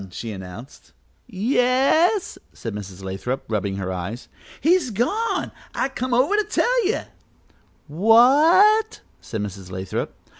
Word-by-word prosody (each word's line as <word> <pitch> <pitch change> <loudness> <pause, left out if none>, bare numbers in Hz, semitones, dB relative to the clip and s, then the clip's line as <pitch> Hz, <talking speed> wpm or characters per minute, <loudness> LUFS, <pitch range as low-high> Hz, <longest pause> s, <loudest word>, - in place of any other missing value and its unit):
she 110 +5 -6
announced. 95 - -11 0.3
"Yes," 265 - +1
said 115 - -6
Mrs. 100 -2 -8
Lathrop, 95 +8 -4
rubbing 100 -3 -2
her 95 -1 -4
eyes. 95 +7 -6 0.3
"He's 335 -3 +2
gone; 260 - -1 0.2
I 270 - 0
come 255 -1 -4
over 275 +12 +3
to 425 - +2
tell 475 +1 +1
you." 435 - 0 0.8
"What 295 - +4
" - - -37
said 110 -3 -5
Mrs. 100 -2 -7
Lathrop. 95 +1 -4
220 Hz, 125 wpm, -22 LUFS, -, 0.8 s, What